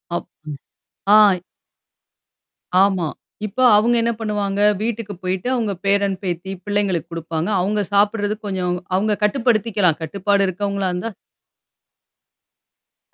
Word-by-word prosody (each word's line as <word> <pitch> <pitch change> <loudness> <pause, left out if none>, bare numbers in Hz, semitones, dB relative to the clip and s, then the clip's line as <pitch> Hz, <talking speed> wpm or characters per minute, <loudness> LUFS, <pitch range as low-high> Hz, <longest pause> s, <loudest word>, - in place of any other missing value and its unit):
App. - - -3 0.6
ம். 200 - -4
ஆ. 205 -4 +6 1.4
ஆமா. 190 -4 +1 0.4
இப்போ 215 +5 -1
அவங்க 235 +3 +3
என்ன 230 +1 +1
பண்ணுவாங்க, 205 -2 -2 0.2
வீட்டுக்கு 225 -2 -3
போயிட்டு 185 +4 -2
அவங்க 220 -5 -1
பேரன் 200 0 +2
பேத்தி 180 +1 -3
பிள்ளைங்களுக்கு 205 -5 -1
குடுப்பாங்க. 165 +1 -3
அவங்க 205 +3 0
சாப்பிடுறது 205 +1 +2
கொஞ்சம் 185 -3 -2 0.2
அவங்க 210 +3 +1
கட்டுப்படுத்திக்கலாம். 210 - +2
கட்டுப்பாடு 200 +4 +1
இருக்கவங்களா 200 +1 -2
இருந்தா. 180 +6 -3 2.0
அ. - - -51
200 Hz, 110 wpm, -20 LUFS, 185-210 Hz, 2.0 s, ஆ